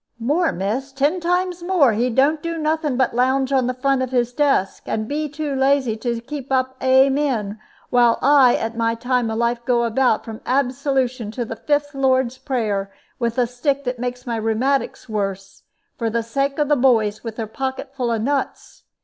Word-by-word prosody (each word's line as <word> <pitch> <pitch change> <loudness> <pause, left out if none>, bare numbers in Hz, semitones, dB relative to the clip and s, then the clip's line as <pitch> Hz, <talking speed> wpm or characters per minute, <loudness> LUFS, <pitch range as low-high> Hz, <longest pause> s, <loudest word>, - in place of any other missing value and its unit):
"More, 295 +9 +1
miss, 220 +10 -3
ten 285 +6 +1
times 355 +1 -1
more! 345 -9 +3
He 240 +4 +1
don't 280 +6 +2
do 335 0 -3
nothing 310 -3 -1
but 260 -3 +1
lounge 260 +2 +1
on 260 -3 +2
the 255 - 0
front 270 +1 +1
of 260 - -1
his 245 -1 0
desk, 275 -9 +1
and 215 0 -2
be 300 +3 -2
too 295 0 -4
lazy 270 -3 +2
to 235 +1 -2
keep 275 +1 -7
up 260 0 +1
'Amen,' 260 -5 +2 0.3
while 240 -2 +4
I 275 -2 +5
at 225 +1 -3
my 230 0 0
time 245 0 0
of 220 - -3
life 235 0 0
go 240 -1 +2
about, 235 0 +1
from 220 -1 -8
Absolution 260 -2 0
to 240 +2 -4
the 225 - -6
fifth 290 +4 -1
Lord's 260 -2 +1
prayer, 210 -8 -2 0.3
with 235 -1 -1
a 250 - +3
stick 270 +4 -1
that 250 -2 -3
makes 245 0 -4
my 235 -2 -2
rheumatics 235 +6 -1
worse, 195 -3 -4 0.4
for 230 - 0
the 230 +1 -1
sake 275 +4 -1
of 295 -1 +1
the 295 - +3
boys 225 -6 +2
with 225 -2 -6
their 225 - -3
pocket 265 +4 -5
full 245 -3 -1
of 225 -1 -1
nuts. 280 +2 -3
255 Hz, 190 wpm, -21 LUFS, 230-275 Hz, 0.4 s, I